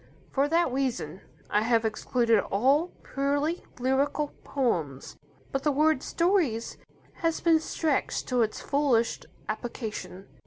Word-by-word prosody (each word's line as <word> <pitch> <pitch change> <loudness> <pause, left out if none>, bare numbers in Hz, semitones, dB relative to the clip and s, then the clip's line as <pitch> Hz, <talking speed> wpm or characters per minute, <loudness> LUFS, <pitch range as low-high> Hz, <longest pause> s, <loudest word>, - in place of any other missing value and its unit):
For 275 +1 +2
that 330 -2 +2
reason 250 - -2 0.3
I 210 - +3
have 230 0 +2
excluded 230 +1 +2
all 270 - +3 0.2
purely 285 +5 -1
lyrical 275 +3 0
poems. 165 - -2 0.4
But 270 - -1
the 295 +1 +2
word 305 0 +3
"stories" 335 - 0 0.4
has 330 -2 0
been 330 -2 +4
stretched 315 -2 -1
to 250 -1 +2
its 220 -1 0
fullest 275 -5 +1 0.2
application. 215 -5 -5
265 Hz, 120 wpm, -28 LUFS, 225-295 Hz, 0.4 s, been